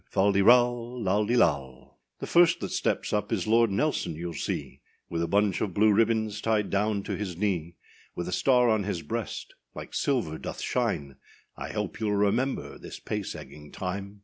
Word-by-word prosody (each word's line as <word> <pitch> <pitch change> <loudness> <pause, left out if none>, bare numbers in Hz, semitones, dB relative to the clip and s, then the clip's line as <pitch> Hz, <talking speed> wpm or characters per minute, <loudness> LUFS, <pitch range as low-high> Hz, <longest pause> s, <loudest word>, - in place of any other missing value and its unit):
Fal 100 +1 +3
de 100 0 +2
ral, 120 +2 +4
lal 105 +2 +1
de 120 - +2
lal, 70 - 0
&c. - - -53
The - - -2
first 170 -1 +4
that - - -4
steps - - -1
up 105 +2 -1
is 100 -6 0
Lord 115 +1 +4
[Nelson] 100 - 0
youâll 85 +1 -5
see, 75 - -4 0.3
With 85 -1 -1
a 85 - 0
bunch 100 -1 +1
of 95 -5 -2
blue 105 +1 +5
ribbons 110 -1 +1
tied 110 -3 0
down 100 0 0
to - - -3
his 95 -5 -5
knee; 85 -4 -1 0.4
With 85 - -4
a - - -4
star 125 +4 +4
on 110 -2 +2
his 90 -4 -3
breast, 75 - -5 0.2
like - - -8
silver 115 - 0
doth - - -6
shine; 70 -2 -2 0.4
I - - -6
hope - - -3
youâll 105 -2 0
remember 125 +7 0
this - - -9
pace 105 -2 -4
egging 75 0 -11
time. 100 +2 -5
105 Hz, 195 wpm, -27 LUFS, 90-115 Hz, 0.4 s, blue